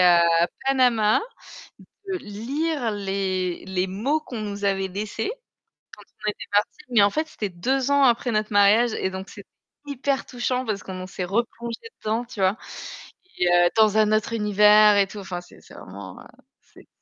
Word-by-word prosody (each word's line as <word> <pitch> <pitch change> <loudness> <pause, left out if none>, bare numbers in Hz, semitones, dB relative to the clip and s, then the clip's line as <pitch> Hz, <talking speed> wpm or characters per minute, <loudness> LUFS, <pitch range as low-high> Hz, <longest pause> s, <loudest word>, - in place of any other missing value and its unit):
à 170 -1 +5 0.2
Panama, 245 - +3 0.9
de 370 - -1
lire 255 +4 -3
les 190 -3 -2
les 190 -1 -1
mots 235 +12 -1
qu'on 245 -6 -7
nous 205 -1 -5
avait 195 -1 0
laissés 205 - -4 0.7
quand - - -38 0.2
on - - +3
était - - -9
partis, 210 +9 0
mais 235 -4 +5
en 200 - +5
fait 310 +9 -1
c'était 215 -9 -5
2 255 +10 -1
ans 280 0 +4
après 245 0 +2
notre 215 -1 -1
mariage 210 +3 +5
et 190 - -2
donc 190 +1 -7
c'était 205 - -12 0.4
hyper 280 -1 -2
touchant 250 +1 -2
parce 215 -4 -3
qu'on 185 -1 -6
s'est 185 - -4
replongés 235 - -3
dedans, 220 +3 -1
tu 230 -2 -13
vois? 190 +3 +2 0.8
Et 180 - +2
heu, 175 0 +5
dans 215 -1 +4
un 215 0 +3
autre 215 +1 0
univers 210 -1 +5
et 200 -1 +3
tout, 205 - -9
enfin 185 -3 -6
c'est 175 - -18
c'est - - -17
vraiment, 95 0 -10
heu, - - -14 0.4
c'est - - -20
210 Hz, 175 wpm, -24 LUFS, 190-240 Hz, 0.9 s, à